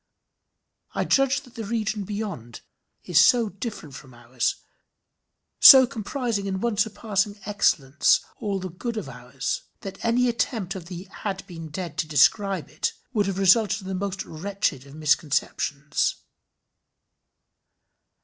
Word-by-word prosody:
I - - 0
judge 275 0 +2
that 250 -4 -18
the 230 - -6
region 215 -1 -2
beyond 195 - -6 0.4
is 175 -2 +3
so 230 +5 +5
different 200 - -7
from 130 -2 -12
ours, 120 0 -2 1.0
so 265 -2 +11
comprising 225 -2 -3
in 190 -1 -2
one 235 +1 -1
surpassing 210 -1 -1
excellence 155 -9 +2 0.2
all 200 -2 -2
the 185 -1 -6
goods 230 +6 -5
of 205 - -4
ours, 125 +1 -4 0.2
that 195 - -8
any 240 +2 +2
attempt 225 -5 -1
of 185 -4 -8
the 180 -1 -7
had 195 0 -6
been 165 -3 -9
dead 170 -1 -6
to - - 0
describe 185 - +2
it, 155 - -3 0.2
would 205 -4 +1
have 195 -1 -2
resulted 200 +2 +4
in 190 - -8
the - - -3
most 195 +1 -3
wretched 165 -5 -3
of 140 - -13
misconceptions. 150 -1 0
195 Hz, 140 wpm, -25 LUFS, 155-215 Hz, 1.0 s, so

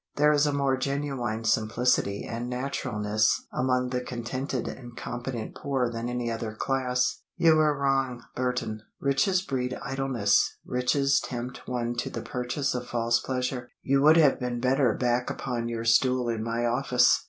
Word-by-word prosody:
There 150 +1 +4
is 150 0 +3
a - - +2
more 140 -2 +1
genuine 130 -5 -2
simplicity 110 -2 +1
and 120 +1 -4
naturalness 110 -5 0
among 125 0 +1
the 125 -1 -1
contented 125 +1 -3
and 120 -2 -8
competent 120 -2 -5
poor 135 -4 -1
than 115 +1 -3
any 120 -1 -2
other 115 -1 -4
class. 125 0 0 0.2
You 160 -1 +5
were 150 -2 +3
wrong, 135 -3 0
Burton. 125 -4 -2 0.2
Riches 140 +7 +2
breed 130 -5 -2
idleness, 130 -7 +1
riches 135 +2 +2
tempt 125 0 -6
one 120 -1 -1
to - - -2
the - - -5
purchase 125 +3 -2
of 125 -1 -4
false 120 0 +1
pleasure. 125 -1 -3
You 135 0 +2
would 155 +3 +7
have 150 -5 +5
been 125 -2 -2
better 130 -2 +2
back 125 0 0
upon 120 -3 -3
your 115 -1 -3
stool 125 +1 +3
in 115 -2 -2
my 115 +1 -1
office." 125 +1 +3
125 Hz, 160 wpm, -27 LUFS, 120-135 Hz, 0.2 s, would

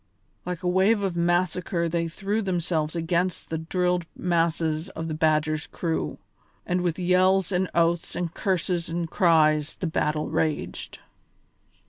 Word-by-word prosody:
Like 180 -1 -4
a - - 0
wave 195 +4 +3
of 190 -3 -1
massacre 175 0 +1
they 165 0 -1
threw 195 +6 -2
themselves 170 -5 -1
against 170 +2 -1
the 160 - -1
drilled 180 +1 0
masses 165 -1 0
of 165 - -4
the 160 - -3
Badger's 155 -1 +1
crew, 165 -2 -2 0.5
and 180 0 0
with 175 -2 -1
yells 185 +1 +3
and 185 0 +1
oaths 170 0 +1
and 175 -2 -3
curses 180 -3 -1
and 170 0 -2
cries 155 -4 +3
the - - -4
battle 150 -2 -1
raged. 160 -1 -2
170 Hz, 140 wpm, -26 LUFS, 160-180 Hz, 0.5 s, wave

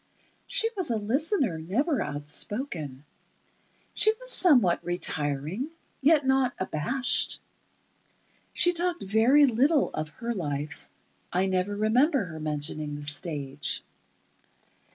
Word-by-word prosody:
She 450 - +3
was 370 -5 -2
a 230 - +1
listener, 255 - 0
never 240 - 0
outspoken. 150 - -4 0.9
She 435 - +4
was - - -7
somewhat 245 - +4
retiring, 160 - -2 0.3
yet 295 0 +4
not 265 -1 +2
abashed. 215 - 0 1.1
She 350 0 +3
talked 350 0 -1
very 225 +9 +5
little 275 +5 +2
of 155 0 -3
her 235 +10 -4
life. 150 -5 -4 0.4
I 185 +2 +1
never 190 +2 0
remember 240 - +2
her 160 -2 -8
mentioning 150 0 -3
the 145 - -7
stage. 145 -2 -2
205 Hz, 110 wpm, -27 LUFS, -, 1.1 s, very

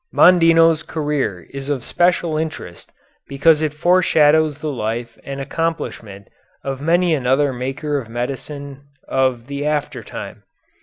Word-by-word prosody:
Mondino's 165 -2 +5
career 145 - -3
is 140 0 -6
of 135 -4 -2
special 175 0 +1
interest 155 - -5 0.4
because 150 +3 +3
it 155 -2 0
foreshadows 155 -2 +3
the 150 0 -4
life 115 -1 -4
and 140 0 -6
accomplishment 135 -9 -4 0.4
of 135 -1 -4
many 170 +2 +2
another 135 0 +1
maker 135 +4 -3
of 115 -4 -9
medicine 135 +3 -5 0.3
of 130 -3 0
the 140 +1 -5
after 150 -1 -2
time. - - -8
145 Hz, 125 wpm, -19 LUFS, 130-160 Hz, 0.4 s, Mondino's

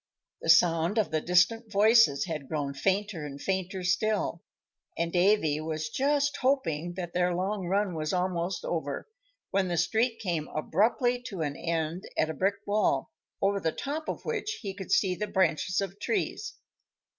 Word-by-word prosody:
The - - -4
sound 170 +3 +4
of 215 -6 +1
the 155 -1 0
distant 210 +7 +2
voices 210 - +5
had 155 -6 -5
grown 145 -2 -2
fainter 190 +3 -1
and 140 -1 -7
fainter 190 +2 -2
still, 190 -1 0 0.6
and 170 0 -1
Davy 175 -5 +3
was 155 -1 -3
just 285 - +1
hoping 175 - 0
that 175 -2 -5
their 180 0 +1
long 190 +1 -2
run 195 0 +1
was 155 -1 -2
almost 180 -1 -1
over, 155 - -3 0.4
when 195 -1 +1
the 175 -1 -1
street 225 +7 +1
came 170 -8 -2
abruptly 235 - +1
to 190 -5 -5
an 145 -2 -2
end 165 +3 -2
at 155 - +2
a - - -5
brick 195 +4 +1
wall, 205 -10 +1 0.3
over 200 0 +2
the 165 -3 0
top 300 - -4
of - - -5
which 435 -2 -2
he 195 -2 -3
could 190 -1 -8
see 190 -3 +3
the 210 +3 -3
branches 185 -1 +1
of 195 +1 -5
trees. 400 - -2
185 Hz, 170 wpm, -28 LUFS, 165-210 Hz, 0.6 s, voices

